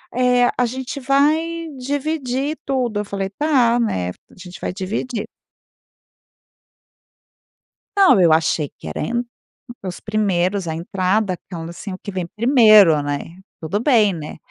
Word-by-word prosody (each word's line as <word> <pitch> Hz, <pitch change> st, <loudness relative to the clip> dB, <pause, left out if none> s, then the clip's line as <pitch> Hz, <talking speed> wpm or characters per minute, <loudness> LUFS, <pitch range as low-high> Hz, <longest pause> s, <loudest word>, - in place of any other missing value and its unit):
eh, 250 Hz, -1 st, +3 dB
a 250 Hz, -, +3 dB
gente 260 Hz, +3 st, -5 dB
vai 315 Hz, +5 st, +1 dB
dividir 280 Hz, +1 st, -2 dB
tudo.", 250 Hz, -6 st, -1 dB
eu 210 Hz, -, -6 dB
falei: 195 Hz, -1 st, -3 dB
"Tá, 245 Hz, -1 st, +2 dB
né, 90 Hz, -, -1 dB
a -, -, -6 dB, 0.2 s
gente 180 Hz, 0 st, -11 dB
vai -, -, -4 dB
dividir.". 215 Hz, +4 st, -4 dB, 2.7 s
Não, 365 Hz, -, +6 dB
eu 170 Hz, -3 st, +5 dB
achei 155 Hz, -2 st, +1 dB
que -, -, -11 dB
era 75 Hz, -, -5 dB
a -, -, -1 dB
en 240 Hz, +1 st, -1 dB, 0.6 s
os 180 Hz, -1 st, -6 dB
primeiros, 200 Hz, -3 st, 0 dB
a 160 Hz, -, -3 dB
entrada 185 Hz, +2 st, -1 dB
quando, 165 Hz, -2 st, -6 dB
assim, 185 Hz, +3 st, -8 dB
o 185 Hz, -, -7 dB
que -, -, -6 dB
vem 185 Hz, -3 st, -3 dB
primeiro, 215 Hz, -, +5 dB
né? 145 Hz, +4 st, -5 dB, 0.2 s
Tudo 180 Hz, +6 st, -2 dB
bem, 220 Hz, -8 st, +3 dB
né? 155 Hz, -2 st, -7 dB
215 Hz, 145 wpm, -20 LUFS, 180-255 Hz, 2.7 s, Não